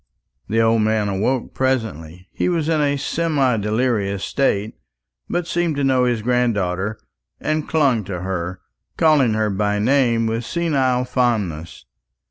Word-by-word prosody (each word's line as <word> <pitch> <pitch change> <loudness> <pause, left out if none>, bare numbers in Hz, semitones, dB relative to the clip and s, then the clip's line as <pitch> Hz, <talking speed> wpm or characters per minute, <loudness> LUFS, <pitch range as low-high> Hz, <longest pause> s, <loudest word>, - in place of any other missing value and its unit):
The 110 +3 +1
old 115 0 +3
man 110 -1 +1
awoke 110 +6 -1
presently. 90 - -2
He - - -1
was 165 -3 0
in 160 -2 +2
a 145 -1 +1
semi 140 -5 0
delirious 105 -2 0
state, 110 -6 0 0.6
but 175 - -1
seemed 170 -2 -1
to 140 - -1
know 130 -2 +3
his 120 -3 0
granddaughter, 110 -5 0 0.4
and 155 0 -2
clung 140 -9 +2
to 90 -2 -5
her, 90 -1 -4 0.4
calling 145 -8 +4
her 110 -1 0
by 105 +1 0
name 115 0 +2
with 115 +1 -1
senile 130 -4 0
fondness. 105 - -2
115 Hz, 140 wpm, -20 LUFS, 105-135 Hz, 0.6 s, calling